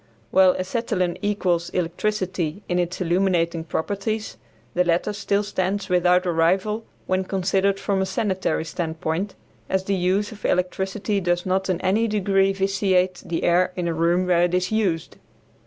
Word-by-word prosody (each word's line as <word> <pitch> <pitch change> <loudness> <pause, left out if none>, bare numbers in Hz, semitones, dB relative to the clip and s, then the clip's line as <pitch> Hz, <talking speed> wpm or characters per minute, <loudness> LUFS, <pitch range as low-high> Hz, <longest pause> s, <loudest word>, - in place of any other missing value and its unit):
While 185 -1 +5
acetylene 185 -2 -1
equals 185 -5 0
electricity 185 0 -2
in 180 0 0
its 175 +1 -2
illuminating 175 -2 +1
properties, 205 +6 -3 0.4
the 180 - +3
latter 175 +4 +1
still 205 0 0
stands 195 0 -2
without 180 0 +3
a 175 - +1
rival 190 +7 +1 0.2
when 185 0 0
considered 195 +1 0
from 195 -1 0
a 190 - 0
sanitary 190 -7 -1
standpoint, 165 +3 -3 0.3
as 190 0 +1
the 200 - -1
use 190 +3 +1
of 210 -3 -12
electricity 190 +3 0
does 175 0 0
not 190 +1 0
in 180 -2 0
any 210 +5 +2
degree 195 -2 +2
vitiate 190 -2 +1
the 165 - -3
air 180 +1 +3
in 175 -2 -2
a 170 - 0
room 170 +3 +2
where 175 -1 +3
it 175 +1 +2
is 185 +2 0
used. 190 -7 -1
185 Hz, 155 wpm, -23 LUFS, 175-195 Hz, 0.4 s, While